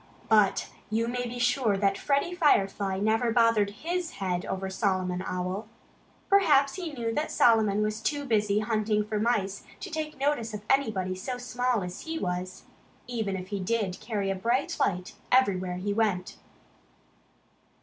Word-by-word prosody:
But 210 -3 +4 0.2
you 225 +2 0
may 245 +1 -2
be 240 +1 -6
sure 245 -4 +2
that 195 0 +2
Freddie 280 - 0
Firefly 200 - +2
never 220 +4 +1
bothered 230 -3 +4
HIS 335 - -3
head 180 -2 -2
over 190 0 -3
Solomon 185 -2 -1
Owl. 185 +4 -3 0.6
Perhaps 295 -9 +4
he 355 -4 -5
knew 235 -5 -3
that 300 +6 -1
Solomon 215 -3 +4
was 215 +1 -2
too 285 +4 -1
busy 210 -4 +2
hunting 215 -1 +1
for 210 0 -2
mice 205 -4 0 0.2
to 385 - -7
take 310 -1 -4
notice 270 -6 0
of 210 0 -8
anybody 215 -9 +1
so 220 +7 -4
small 245 -2 -1
as 180 0 -6
he 325 0 -4
was, 180 - -3 0.4
even 220 -5 -2
if 185 0 -6
he 200 -1 -3
did 190 -1 -1
carry 210 -3 -2
a - - -1
bright 235 +8 0
light 180 -1 0 0.2
everywhere 185 -8 +3
he 200 +3 -2
went. 200 -4 0
215 Hz, 160 wpm, -28 LUFS, 195-245 Hz, 0.6 s, But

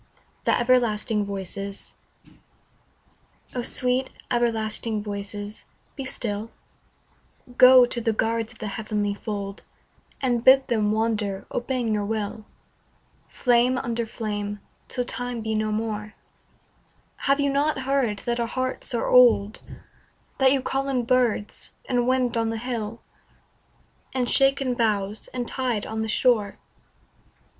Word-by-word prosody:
THE - - +3
EVERLASTING 230 -4 +2
VOICES 200 0 -5 1.6
O 250 - -2
SWEET 250 +2 0 0.2
everlasting 225 -2 0
Voices 205 0 -6 0.3
be 270 - -5
still; 220 -4 -3 1.1
Go 255 0 +9
to 240 0 -4
the 225 - +1
guards 225 +1 -1
of 245 - -12
the 215 - -5
heavenly 210 0 -2
fold 200 -1 -5 0.6
And 245 -3 0
bid 265 +1 +7
them 215 -3 +2
wander 215 -3 -1
obeying 245 -2 -1
your 210 -1 0
will 215 0 -3 0.8
Flame 245 0 +2
under 235 -3 -2
flame, 205 -2 -4 0.3
till 250 - -2
Time 245 -1 -4
be 220 0 -2
no 215 0 0
more; 215 -1 -3 1.1
Have 275 +1 +4
you 280 -1 +2
not 285 0 +1
heard 260 -6 0
that 240 0 -1
our 235 - 0
hearts 255 +1 -3
are 230 - -1
old, 230 -4 +5 0.8
That 265 -1 +5
you 270 -1 +2
call 270 +1 -1
in 250 -3 0
birds, 245 -4 0
in 245 -1 +1
wind 255 -2 +2
on 225 -1 +1
the 225 - -2
hill, 230 -1 -4 1.1
In 255 -2 +1
shaken 270 0 +3
boughs, 215 -3 -1
in 250 -1 -3
tide 245 -5 -2
on 220 0 -3
the 220 - -2
shore? 215 -3 +2
230 Hz, 130 wpm, -25 LUFS, 210-250 Hz, 1.6 s, Go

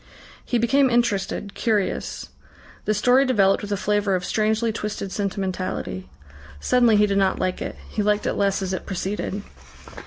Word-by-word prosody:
He 245 - 0
became 265 +4 +3
interested, 205 -4 0
curious. 215 -4 -1 0.6
The 215 - +1
story 250 +6 +4
developed 200 -7 +3
with 205 - -6
a 200 - +1
flavour 205 -1 +1
of 180 -1 -2
strangely 220 +2 +1
twisted 210 -3 -4
sentimentality. 185 - -3 0.5
Suddenly 240 - +4
he 210 0 +5
did 200 -1 +1
not 190 -1 +2
like 185 -1 -2
it. - - -4
He 215 - -2
liked 210 0 +1
it - - +1
less 200 -1 0
as 190 0 -2
it 185 - -5
proceeded. 200 +1 -3
205 Hz, 160 wpm, -23 LUFS, 195-220 Hz, 0.6 s, he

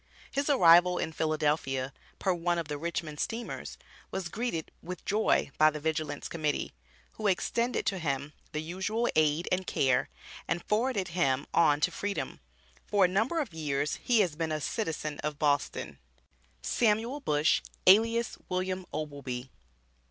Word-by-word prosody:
His 280 +2 -1
arrival 180 -7 +6
in 160 - -2
Philadelphia, 150 -4 0 0.2
per 190 - +1
one 175 0 0
of 165 -2 -2
the 150 -1 -3
Richmond 160 -2 -3
steamers, 235 +1 -4 0.3
was 190 -3 -4
greeted 220 -6 -3
with 180 0 -7
joy 210 -8 +2
by 155 0 +7
the 155 0 -5
Vigilance 155 -1 -2
Committee, 155 -3 -2 0.4
who 215 - -3
extended 235 +5 0
to 195 - 0
him 140 -2 -2 0.2
the 155 -1 -3
usual 190 +8 -1
aid 155 +2 +2
and 185 0 0
care, 130 -2 +2 0.4
and 175 - -1
forwarded 215 -2 +1
him 140 -6 +1
on 150 -3 +4
to - - +3
freedom. 205 0 -3 0.5
For 200 -2 +4
a - - +4
number 220 - +1
of 260 - -5
years, 145 -2 -1
he 235 -3 +4
has 175 -6 0
been 160 0 -2
a 155 - -1
citizen 155 -4 -3
of 150 -1 -3
Boston. 145 -2 0 0.6
SAMUEL 230 - +1
BUSH, 150 - +2 0.2
ALIAS 230 +4 +5
WILLIAM 185 0 -2
OBLEBEE. 140 -4 -5
170 Hz, 150 wpm, -30 LUFS, 150-205 Hz, 0.6 s, by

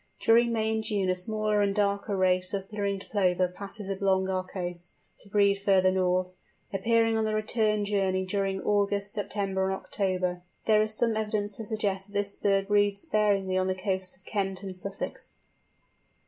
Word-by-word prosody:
During 235 +1 +4
May 220 -1 0
and 220 0 -1
June 200 -4 0
a - - 0
smaller 215 +2 0
and 200 -1 +1
darker 200 0 0
race 185 0 +2
of 195 -1 -4
Ringed 200 -2 -2
Plover 185 -3 +2
passes 195 +3 -8
along 190 -1 +1
our 185 -1 0
coasts, 175 -2 -5 0.3
to 200 - -11
breed 200 -1 +3
further 190 -2 +4
north; 185 0 0 0.4
appearing 225 +3 +2
on - - +1
the 215 0 0
return 215 -1 +1
journey 190 -2 0
during 195 0 -1
August, 200 0 +1
September, 195 -2 -1
and 190 0 0
October. 185 -2 -2 0.2
There 215 -1 +5
is 215 0 0
some 230 -2 +1
evidence 210 -1 -1
to 225 - -6
suggest 205 -3 -2
that 205 - -19
this 200 0 -1
race 195 -1 +3
breeds 205 0 +2
sparingly 195 -3 +1
on 185 - 0
the 185 - 0
coasts 185 -1 -1
of 190 - -25
Kent 195 -2 -2
and 190 -1 -6
Sussex. 195 +2 -6
200 Hz, 175 wpm, -28 LUFS, 190-210 Hz, 0.4 s, There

